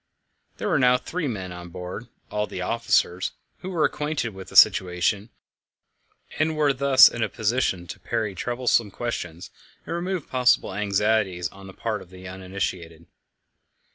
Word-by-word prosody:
There - - -3
were - - +2
now 125 -1 +5
three 165 +5 -4
men 95 -7 -4
on 90 0 -8
board 90 +6 -7 0.2
all 105 0 -1
the 90 - -5
officers 95 -5 +1 0.3
who 185 - -6
were 170 -4 +1
acquainted 150 -5 -1
with 95 0 -10
the - - -13
situation, 95 +4 +4 1.1
and 155 0 +1
were 145 -2 +3
thus 135 0 +7
in 120 - -3
a - - +1
position 110 -5 0
to 95 +2 -8
parry 105 +2 -2
troublesome 120 +1 0
questions 90 -6 -5 0.3
and - - -3
remove 180 -2 -3
possible 125 -6 +2
anxieties 100 -2 +1
on 95 0 -13
the 95 - -11
part 110 0 -3
of 90 - -14
the 95 0 -11
uninitiated. 90 -3 -5
105 Hz, 155 wpm, -25 LUFS, 95-125 Hz, 1.1 s, thus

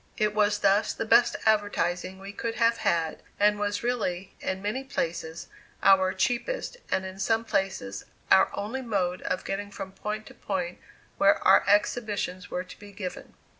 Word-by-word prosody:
It 210 -2 +1
was 210 -1 +3
thus 200 +2 +3
the - - -3
best 235 +2 +5
advertising 190 -4 +1
we 195 +1 -8
could 225 +2 -3
have 230 0 +3
had, 165 -6 0 0.2
and 210 0 +4
was 205 +1 -1
really, 195 -6 -2
in 190 0 -2
many 210 +7 -2
places, 165 -9 -3 0.4
our 190 -1 +6
cheapest - - -1
and 190 - 0
in 190 +1 -8
some 225 +3 +1
places, 190 - -2 0.3
our 190 - +7
only 220 +6 -3
mode 190 -7 -1
of - - -2
getting 200 +1 -3
from 195 -1 -7
point 210 +2 -5
to - - -12
point 180 -3 -3 0.4
where 200 0 +6
our - - +7
exhibitions 205 -3 +1
were 180 - -2
to 180 - -13
be 205 -1 -12
given. 190 -2 -7
200 Hz, 170 wpm, -27 LUFS, 185-215 Hz, 0.4 s, our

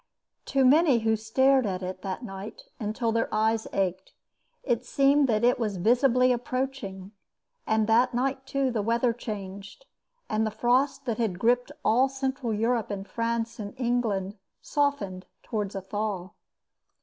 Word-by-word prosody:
To 270 -1 +2
many 280 -2 +5
who 220 0 +2
stared 260 +3 +3
at 185 -1 -3
it 185 0 -5
that 195 +4 -5
night 200 - -8 0.2
until 225 +1 -1
their 230 0 0
eyes 220 +1 +1
ached, 190 -1 -2 0.5
it 240 -2 0
seemed 275 +2 +3
that 215 0 +1
it 245 +1 +3
was 210 -4 -1
visibly 250 +5 +3
approaching. 245 -6 -3 0.6
And 220 0 +2
that 235 +3 +4
night, 265 +2 -1
too, 275 -1 0
the 225 -3 -1
weather 235 +3 +1
changed, 205 - -7 0.4
and 215 +1 0
the 220 - +1
frost 250 +5 +1
that 235 -3 -2
had 215 -6 0
gripped 245 +5 +2
all 255 +4 +4
Central 265 -2 -2
Europe 225 +1 0
and 200 -1 -5
France 230 +2 -2
and 205 +4 -7
England 220 -5 -1 0.2
softened 250 -11 -1 0.2
towards 210 -3 -3
a 195 - -3
thaw. 195 -1 -3
230 Hz, 150 wpm, -27 LUFS, 205-255 Hz, 0.6 s, many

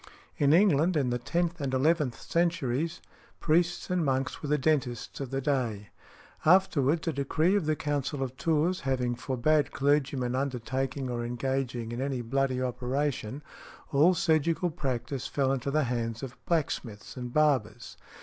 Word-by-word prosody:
In 145 -1 +4
England, 170 -1 +4
in 130 -4 +1
the 120 - -1
tenth 170 +5 -1
and 135 -2 -1
eleventh 145 -3 +1
centuries, 165 -2 -1 0.4
priests 170 +2 +1
and 180 -2 +1
monks 135 -2 -1
were 145 - -4
the 150 - +3
dentists 135 -5 -1
of 135 -3 -4
the 135 +1 -2
day. 120 -8 -1 0.5
Afterwards, 165 -2 +3
a 165 - +1
decree 155 +7 +1
of 190 -7 0
the 155 - +2
Council 145 -1 -2
of 130 -1 -5
Tours 165 +5 +1
having 125 -3 -1
forbad 135 +4 +1
clergymen 140 -3 +1
undertaking 130 +1 -2
or 120 -1 -3
engaging 125 -1 -2
in 120 +2 -4
any 135 -2 -2
bloody 130 +2 0
operation, 130 +1 -2 0.5
all 155 +6 +5
surgical 165 0 +1
practice 135 -3 -3
fell 135 -2 0
into 135 +1 -2
the 155 +2 +2
hands 115 -2 -2
of 130 -1 -6
blacksmiths 130 -10 -2
and 125 -2 -6
barbers. 125 -6 +1
135 Hz, 150 wpm, -29 LUFS, 125-155 Hz, 0.5 s, all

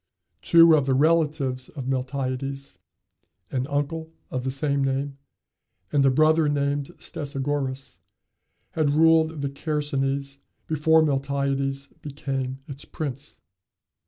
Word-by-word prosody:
Two 165 -1 +7
of 145 -3 +1
the 135 - +3
relatives 145 -4 +1
of 135 -4 -7
Miltiades 135 +1 -3 0.7
an 130 0 -1
uncle 160 +3 -2 0.2
of 130 -1 -2
the 130 - -1
same 140 +1 0
name, 135 +1 -2 0.7
and 145 -2 +3
a 135 - +5
brother 155 +3 +4
named 140 -1 0
Stesagoras 140 -1 -4 0.7
had 155 -2 +1
ruled 160 0 +3
the 140 - 0
Chersonese 140 -2 -2 0.3
before 160 +1 +3
Miltiades 140 -1 -1
became 135 -2 -4
its 140 0 -8
prince. 145 -2 -6
140 Hz, 110 wpm, -25 LUFS, 135-150 Hz, 0.7 s, Two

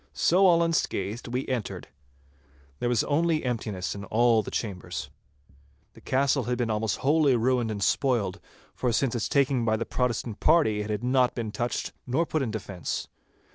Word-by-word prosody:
So 190 +3 +4
all 170 -1 +5
unscathed 120 - -1
we 125 +2 -3
entered. 120 -7 -3 0.9
There 120 - 0
was 120 -3 +2
only 160 +1 +1
emptiness 110 -7 -3
in 100 - -7
all 115 +1 +3
the - - -7
chambers. 100 -6 -4 0.8
The - - -16
castle 135 -1 +1
had 125 0 -1
been 120 -2 0
almost 105 -2 -1
wholly 145 -2 +4
ruined 120 0 +1
and 100 -2 -3
spoiled, 115 -6 +1 0.3
for 125 - -1
since 120 +2 +1
its 120 -3 -2
taking 135 -3 +2
by 110 -1 +1
the 115 - -3
Protestant 120 -3 -2
party, 130 -11 +3
it 105 - -5
had 105 +2 -2
not 125 0 +2
been 115 -3 -3
touched 120 +3 -2 0.2
nor 135 +7 +1
put 155 -1 -1
in 130 - -1
defence. 100 -6 -4
120 Hz, 175 wpm, -27 LUFS, 110-135 Hz, 0.9 s, all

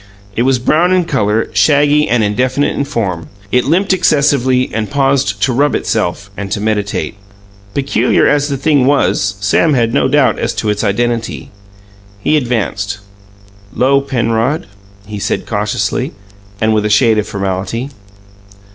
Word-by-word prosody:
It - - 0
was 130 +1 +2
brown 155 +8 +2
in 180 -2 +2
colour, 105 -7 0
shaggy 145 +8 +3
and 115 -2 +2
indefinite 130 +7 0
in 140 - -1
form; 95 - -3 0.2
it 125 0 +2
limped 185 +7 +2
excessively, 140 -7 +2
and 110 -2 -2
paused 135 -7 +1
to 130 - +2
rub 145 +4 +2
itself, 105 -2 -2
and 100 -1 -6
to - - -2
meditate. 105 -1 -2 0.6
Peculiar 140 0 +1
as 145 0 +1
the 140 - -2
thing 140 -2 +2
was, 100 -7 +1
Sam 140 +9 +2
had 115 -2 +1
no - - +2
doubt - - +2
as - - -2
to 105 - -1
its 105 - -2
identity. 115 +2 -2 0.7
He 150 - +1
advanced. 110 -6 -1 0.8
"'Lo, 140 +2 +3
Penrod," 125 +1 -1 0.4
he 105 0 -7
said - - -2
cautiously, - - -2 0.5
and 110 0 +2
with 105 -1 +1
a 105 - 0
shade 110 0 +3
of 105 - -3
formality. 100 +7 -3
120 Hz, 150 wpm, -14 LUFS, 105-140 Hz, 0.8 s, shaggy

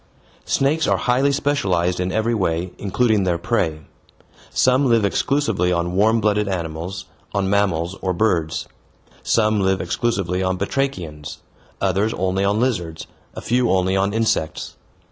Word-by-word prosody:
Snakes 150 +4 +1
are - - +3
highly 130 +3 +2
specialized 95 -12 0
in 90 0 -1
every 110 +3 0
way, 90 -4 -1
including 105 +1 +1
their 90 -2 +1
prey. 85 -5 -1 0.7
Some 130 +2 +3
live 115 -3 +3
exclusively 100 - +1
on 85 0 -1
warm 110 +4 +3
blooded 105 -1 +1
animals, 85 -1 -4 0.3
on 100 -1 0
mammals, 95 -3 +1
or 95 - 0
birds. 85 -5 0 0.5
Some 110 -2 +2
live 95 -1 +1
exclusively 95 -6 -1
on 95 0 0
batrachians, 90 - -3 0.4
others 100 +3 0
only 95 +1 0
on 100 +2 +1
lizards, 90 -11 -1 0.3
a - - -6
few 125 +1 +1
only 95 0 +2
on 100 +1 +1
insects. 110 -8 -1
100 Hz, 140 wpm, -21 LUFS, 90-115 Hz, 0.7 s, are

